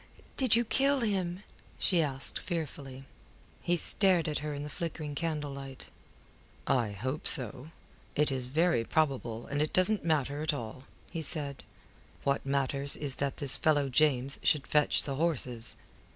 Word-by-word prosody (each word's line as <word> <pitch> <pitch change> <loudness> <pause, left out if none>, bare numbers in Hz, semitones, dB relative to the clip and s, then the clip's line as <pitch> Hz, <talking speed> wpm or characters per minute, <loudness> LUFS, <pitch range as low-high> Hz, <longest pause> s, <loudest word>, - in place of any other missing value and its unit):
did 255 -5 +2
you 235 +1 +1
kill 275 +3 +1
him?" 190 -4 -2 0.3
she 175 -3 +1
asked, 135 -3 -2
fearfully. 140 -5 -6 0.6
He 175 0 0
stared 180 -1 +3
at 150 - -2
her 150 0 -5
in 145 0 -5
the 150 - -7
flickering 155 -1 -5
candlelight. 145 -4 -5 0.7
"I 120 -5 +1
hope 130 +9 -3
so. 130 +1 +7 0.5
It 150 -1 +2
is 130 -2 -1
very 160 -1 +1
probable, 125 -5 -1
and 145 +1 -2
it 155 - -1
doesn't 200 +3 +3
matter 145 -3 -1
at 155 -1 0
all," 120 +1 -8 0.3
he 165 - -4
said. 145 -3 +4 0.6
"What 140 0 0
matters 140 0 0
is 140 -3 0
that 140 -1 -2
this 140 -3 +2
fellow 145 -3 +1
James 135 -1 +1
should 150 -3 +2
fetch 150 -1 +2
the 135 -2 -4
horses." 125 -8 -1
145 Hz, 150 wpm, -30 LUFS, 135-165 Hz, 0.7 s, so